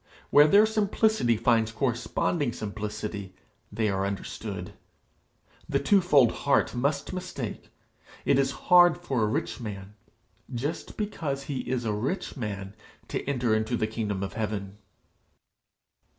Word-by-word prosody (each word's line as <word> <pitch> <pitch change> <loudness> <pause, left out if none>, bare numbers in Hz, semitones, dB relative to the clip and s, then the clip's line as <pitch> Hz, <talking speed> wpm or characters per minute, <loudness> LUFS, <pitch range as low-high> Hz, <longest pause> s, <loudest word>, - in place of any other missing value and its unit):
Where 145 +1 +8
their 205 +6 +6
simplicity 215 - +2
finds 115 -1 +2
corresponding 125 +4 -1
simplicity, 105 -2 -5 0.4
they 110 +1 0
are 95 -1 0
understood. 100 0 -5 1.0
The - - +2
twofold 175 - +4
heart 140 - +1
must 140 +6 -1
mistake. 180 - -5 0.6
It - - +4
is 135 -1 +2 0.2
hard 175 -2 +7
for 130 -4 -2
a 105 - +3
rich 110 - -2
man, 100 -3 -7 0.6
just 135 +6 -4
because 160 -10 -3
he 140 -2 -4
is 125 -2 -1
a 110 - 0
rich 125 - -3
man, 100 -6 -5 0.4
to - - -2
enter 125 -5 +1
into 110 +2 0
the 110 - +1
kingdom 105 -3 -3
of 95 - -4
heaven.' 105 -2 -4
120 Hz, 130 wpm, -27 LUFS, 105-145 Hz, 1.0 s, Where